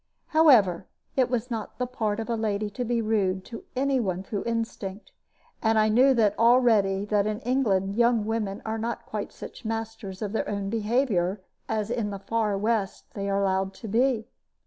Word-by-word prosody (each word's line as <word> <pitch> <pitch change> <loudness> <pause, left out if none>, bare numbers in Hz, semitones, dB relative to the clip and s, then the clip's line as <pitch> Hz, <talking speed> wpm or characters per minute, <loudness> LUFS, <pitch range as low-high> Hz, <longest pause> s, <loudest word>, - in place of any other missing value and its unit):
However, 230 - +5 0.3
it 255 -2 +3
was 245 0 -2
not 225 -2 -4
the 250 - -1
part 220 -4 -2
of 225 - -3
a 235 - 0
lady 210 -1 -1
to 245 +5 -3
be 235 -1 0
rude 195 -4 0
to 230 -2 -9
any 270 0 +2
one 190 -5 -2
through 200 0 -4
instinct; 225 -4 -4 0.5
and 220 -1 +2
I 215 0 +4
knew 255 +4 +5 0.2
already 225 -5 +4
that 205 -1 +1
in 215 0 -2
England 205 -7 +1
young 235 -1 +3
women 215 -3 -2
are 220 0 -2
not 230 +1 -3
quite 210 -1 -4
such - - -10
masters 225 -3 -4
of 205 - -3
their 220 - -2
own 200 -1 -3
behavior 215 -4 +1 0.3
as 215 0 -1
in 230 -4 -1
the 200 - -4
far 210 +1 -1
West 210 -1 -2
they 200 -1 -3
are 200 0 +1
allowed 190 0 0
to 225 - -8
be. 230 +1 +1
220 Hz, 185 wpm, -26 LUFS, 200-235 Hz, 0.5 s, However